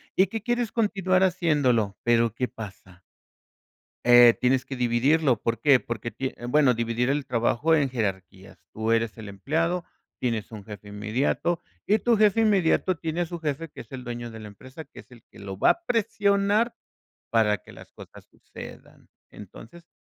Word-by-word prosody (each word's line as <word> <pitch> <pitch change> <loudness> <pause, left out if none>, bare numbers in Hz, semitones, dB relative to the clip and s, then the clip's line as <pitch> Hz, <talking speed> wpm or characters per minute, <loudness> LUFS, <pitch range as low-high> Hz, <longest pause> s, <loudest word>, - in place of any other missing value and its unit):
y 190 - +4
que 220 +2 -6
quieres 240 -1 -1
continuar 195 -4 +1
haciéndolo, 145 - +1
pero 115 -1 +2
¿qué 125 - -1
pasa? 100 -6 -11 1.0
Eh, 120 -1 +7
tienes 130 +1 +1
que 135 - -6
dividirlo, 125 +2 +2
¿por 115 -1 -1
qué? 135 +1 +5
Porque, 115 -1 -5
tie 130 0 -5
bueno, 140 0 +4
dividir 115 +2 -1
el 140 0 0
trabajo 120 +6 +1
en 145 -3 +1
jerarquías. 95 -5 -5
Tú 110 +1 -2
eres 115 0 0
el 110 -2 -8
empleado, 165 - -1 0.4
tienes 115 -4 -2
un 105 -3 -9
jefe 105 -1 -11
inmediato 120 +11 -1 0.3
y 215 +2 +3
tu 240 -1 +2
jefe 215 +1 +4
inmediato 190 -4 +2
tiene 165 +2 -3
a - - 0
su 170 +1 -7
jefe, 155 +1 -3
que - - -10
es - - -16
el 130 -1 -7
dueño 120 -1 -6
de 110 - -10
la 110 - -9
empresa, 130 +9 -12
que - - -15
es - - -16
el 120 -3 -16
que - - -15
lo 95 -1 -7
va - - +5
a 345 - -6
presionar 205 0 +1 0.5
para 110 -2 +2
que - - -16
las - - -14
cosas - - -14
sucedan. - - -13 0.2
Entonces, 115 - -13
125 Hz, 175 wpm, -25 LUFS, 115-170 Hz, 1.0 s, Eh